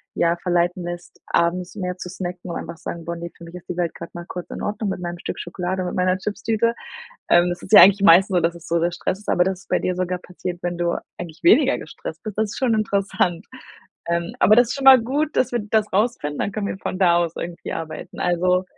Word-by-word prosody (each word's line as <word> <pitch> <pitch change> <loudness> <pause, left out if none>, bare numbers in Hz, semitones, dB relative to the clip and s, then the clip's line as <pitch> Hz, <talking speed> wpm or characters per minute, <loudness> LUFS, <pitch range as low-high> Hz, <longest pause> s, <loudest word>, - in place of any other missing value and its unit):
ja, 170 0 +2
verleiten 175 0 0
lässt, 175 0 -8
abends 175 +2 0
mehr 180 -3 -3
zu 180 - -7
snacken 180 -1 -6
und - - -3
einfach - - -7
sagen: 170 0 -7
„Boah 170 - -3
ne, 170 0 -6
für 170 - -11
mich 170 +1 -11
ist 180 - -11
die 175 - -4
Welt 175 -2 -1
gerade 170 - -9
mal 175 0 -7
kurz 180 -1 -7
in - - -7
Ordnung 210 0 -2
mit 190 - -3
meinem 175 0 -5
Stück - - -5
Schokolade 180 +2 -3
und - - -3
mit - - -6
meiner 185 0 +2
Chipstüte.“ 215 +3 -1 0.6
Ähm, 175 +1 +5
das 175 0 -4
ist - - -10
ja - - +11
eigentlich 200 +1 +6
meistens 190 +1 +7
so, - - +4
dass 165 +1 0
das 170 -1 -12
so 170 - +2
der 170 +1 0
Stress 180 +2 -3
ist, 210 - -18
aber 175 - +3
das 185 0 -1
ist - - -26
bei - - +1
dir 180 - -1
sogar 180 0 -1
passiert, 180 0 -7
wenn 175 -1 -3
du 170 0 +1 0.3
eigentlich 165 -2 -8
weniger 265 - +5
gestresst - - -8
bist, 215 -3 -7
das 220 -1 +1
ist - - -7
schon 250 -4 +2
interessant. 200 -4 0 0.6
Ähm, 170 0 -2
aber 210 - +6
das 240 -1 +5
ist - - -2
schon 275 - -5
mal 265 -2 +9
gut, 290 +6 -1
dass 255 - +2
wir 240 - 0
das 215 -1 +1
rausfinden, 195 -8 0
dann 200 - -2
können 200 0 -3
wir - - -5
von 185 - -4
da 175 -3 +4
aus 170 -2 0
irgendwie 170 0 -6
arbeiten, 160 -1 -7
also 180 +1 +2
180 Hz, 255 wpm, -22 LUFS, 175-205 Hz, 0.6 s, ja